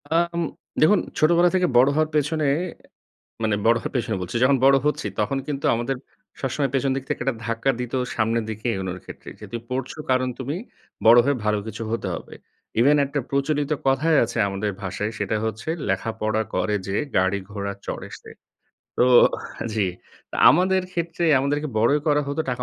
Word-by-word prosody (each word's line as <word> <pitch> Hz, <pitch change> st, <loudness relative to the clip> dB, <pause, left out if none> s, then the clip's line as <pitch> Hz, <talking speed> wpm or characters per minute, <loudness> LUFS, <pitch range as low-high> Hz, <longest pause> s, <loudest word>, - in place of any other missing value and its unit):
আম 170 Hz, +1 st, +1 dB, 0.4 s
দেখুন 165 Hz, +7 st, +5 dB, 0.2 s
ছোটবেলা 170 Hz, +3 st, +5 dB
থেকে 180 Hz, -1 st, +3 dB
বড় 125 Hz, +2 st, +7 dB
হওয়ার 155 Hz, 0 st, +2 dB
পেছনে, 150 Hz, +1 st, +1 dB, 1.0 s
মানে 110 Hz, -1 st, +2 dB
বড় 115 Hz, +1 st, +5 dB
হওয়ার -, -, -5 dB
পেছনে 115 Hz, -3 st, 0 dB
বলছি। 90 Hz, +5 st, -6 dB
যখন 135 Hz, +1 st, +4 dB
বড় 135 Hz, 0 st, +7 dB
হচ্ছি 150 Hz, -7 st, 0 dB
তখন 110 Hz, +6 st, 0 dB
কিন্তু 140 Hz, -2 st, -3 dB
আমাদের 120 Hz, +3 st, -2 dB, 0.4 s
সবসময় 135 Hz, +1 st, -1 dB
পেছনের 135 Hz, 0 st, +1 dB
দিক 135 Hz, -, -3 dB
থেকে -, -, -2 dB
একটা 135 Hz, -3 st, 0 dB
ধাক্কা 115 Hz, +4 st, 0 dB
দিত 125 Hz, -1 st, -5 dB, 0.2 s
সামনের 115 Hz, +1 st, +1 dB
দিকে 110 Hz, +1 st, -7 dB
এগোনোর 95 Hz, -1 st, -4 dB
ক্ষেত্রে। -, -, -10 dB
যেহেতু 120 Hz, -, -6 dB
পড়ছ 130 Hz, 0 st, -3 dB, 0.2 s
কারণ 130 Hz, 0 st, +2 dB
তুমি 135 Hz, +4 st, -3 dB, 0.5 s
বড় 115 Hz, +2 st, +8 dB
হয়ে 140 Hz, -1 st, +1 dB
ভালো 105 Hz, 0 st, +2 dB
কিছু 110 Hz, +1 st, -5 dB
হতে 115 Hz, -3 st, -2 dB
হবে। -, -, -9 dB, 0.5 s
ইভেন 145 Hz, +5 st, +5 dB
একটা 140 Hz, +1 st, -2 dB
প্রচলিত 145 Hz, +1 st, 0 dB, 0.2 s
কথাই 150 Hz, +4 st, +3 dB
আছে 115 Hz, +1 st, -4 dB
আমাদের 100 Hz, +1 st, -2 dB
ভাষায় 100 Hz, +3 st, -3 dB
সেটা 105 Hz, +1 st, -1 dB
হচ্ছে, 110 Hz, +6 st, -4 dB, 0.2 s
"লেখাপড়া 110 Hz, +2 st, -1 dB
করে 105 Hz, -, 0 dB
যে 95 Hz, -, -2 dB, 0.2 s
গাড়ি 95 Hz, +2 st, +2 dB
ঘোড়া 100 Hz, -1 st, -4 dB
চড়ে -, -, -5 dB
সে।" -, -, -14 dB, 0.7 s
তো -, -, +5 dB, 0.7 s
জি। 105 Hz, -3 st, +1 dB, 0.4 s
তো -, -, -5 dB
আমাদের 185 Hz, +3 st, +3 dB
ক্ষেত্রে 170 Hz, 0 st, -2 dB, 0.2 s
আমাদেরকে 145 Hz, +2 st, -1 dB
বড়ই 130 Hz, +7 st, +3 dB
করা 150 Hz, -1 st, +3 dB
হতো 145 Hz, +2 st, -2 dB
টাকা 125 Hz, 0 st, -3 dB
130 Hz, 170 wpm, -23 LUFS, 110-150 Hz, 1.0 s, বড়